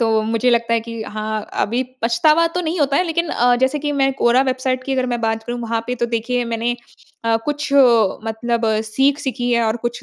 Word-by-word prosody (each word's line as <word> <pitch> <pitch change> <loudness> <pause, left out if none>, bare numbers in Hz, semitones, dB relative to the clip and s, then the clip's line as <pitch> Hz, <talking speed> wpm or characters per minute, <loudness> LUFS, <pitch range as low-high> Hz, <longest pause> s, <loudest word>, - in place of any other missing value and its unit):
तो 225 -1 +2
मुझे 230 +3 +1
लगता 235 -1 +1
है 230 - +1
कि 230 0 -7
हाँ, 215 0 -4
अभी 240 +4 0 0.2
पछतावा 305 +9 +3
तो 360 +2 -3
नहीं 340 +1 -2
होता 280 -1 +2
है 365 - +2
लेकिन 340 0 -1
अ, 245 -2 +3
जैसे 260 +4 +1
कि 295 0 -2
मैं 270 -1 +2
क्वोरा 255 0 +3
वेबसाइट 255 -1 -1
की 270 - -2
अगर 255 -1 0
मैं 240 -1 -2
बात 225 -1 -1
करूँ, 240 +1 -4
वहाँ 230 -1 -2
पे 250 - -2
तो 240 -1 -1
देखिए 235 +2 -1
मैंने 235 +1 -2 0.5
अ, 225 0 +3
कुछ 295 -1 -3 0.5
मतलब 230 +1 -2 0.2
सीख 270 +6 +1
सीखी 250 -3 -2
है 235 -1 +2
और 220 +1 0
कुछ 240 0 -4
240 Hz, 220 wpm, -19 LUFS, 230-270 Hz, 0.5 s, पछतावा